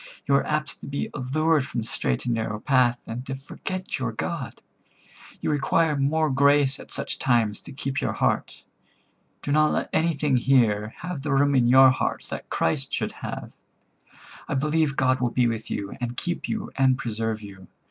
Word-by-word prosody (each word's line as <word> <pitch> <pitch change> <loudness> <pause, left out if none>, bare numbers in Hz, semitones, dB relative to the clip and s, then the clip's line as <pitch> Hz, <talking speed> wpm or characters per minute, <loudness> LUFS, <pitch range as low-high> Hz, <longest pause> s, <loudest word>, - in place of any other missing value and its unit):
You 140 - +1
are 140 - +3
apt 150 0 -2
to - - -8
be 140 0 -3
allured 150 +3 +1
from 125 -3 -3
the 110 - -7
straight 65 - -2
and 120 - +1
narrow 110 -2 -2
path, 125 -2 +3
and 115 +2 -5
to 135 - -3
forget 185 +7 -5
your 125 -3 -1
God. 130 +4 -4 0.8
You - - 0
require 150 +2 +2
more 150 +2 +1
grace 140 0 +3
at - - -12
such - - -4
times 115 -5 +1
to - - -11
keep 135 0 -3
your - - -1
heart. - - -1 0.8
Do 145 - -2
not 155 +1 +4
let - - -1
anything 150 -4 +2
here 115 -5 +2
have 180 -5 -4
the 145 +1 -3
room 140 +1 +3
in 125 -3 +4
your 130 +1 +8
heart 130 - -2
that - - -6
Christ - - -1
should - - -1
have. - - -7 1.0
I - - -2
believe 150 +1 +1
God 130 -1 +2
will 125 - +2
be 125 +1 +2
with 115 -2 -2
you, 100 -1 -4
and 120 0 -3
keep 175 0 -3
you, 220 -1 -3
and 130 -1 +3
preserve 110 -2 -3
you. 95 -2 -11
135 Hz, 190 wpm, -25 LUFS, 120-150 Hz, 1.0 s, your